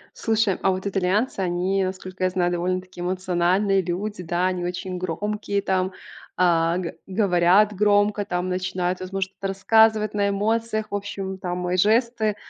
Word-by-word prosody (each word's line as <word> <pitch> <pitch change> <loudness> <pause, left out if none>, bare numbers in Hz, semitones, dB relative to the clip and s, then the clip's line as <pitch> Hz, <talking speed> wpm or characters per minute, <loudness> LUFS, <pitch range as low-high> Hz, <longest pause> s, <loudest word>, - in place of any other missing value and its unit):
Слушай, 220 -3 +1
а 195 - +3
вот 185 +1 -4
итальянцы, 200 +5 0
они, 185 +2 0
насколько 185 0 -5
я 185 - +2
знаю, 180 -1 0
довольно-таки 185 +1 -3
эмоциональные 185 +2 +1
люди. 185 +2 -4
Да, 175 +2 0
они 180 -1 -3
очень 180 +1 -4
громкие, 200 +3 -2
там. 190 0 0 0.5
А, 170 -1 +3
г 175 -3 -5
говорят 195 +1 +3
громко, 205 +1 +2
там, 180 -2 -2
начинают, 180 0 -2
возможно, 190 +1 -3
что-то 195 0 -6
рассказывать 215 +2 +3
на 200 -1 +1
эмоциях. 220 +2 -1
В - - -5
общем, 195 -1 -4
там 180 -1 -3
и 180 - +1
жесты, 220 +2 +2
190 Hz, 155 wpm, -23 LUFS, 180-205 Hz, 0.5 s, а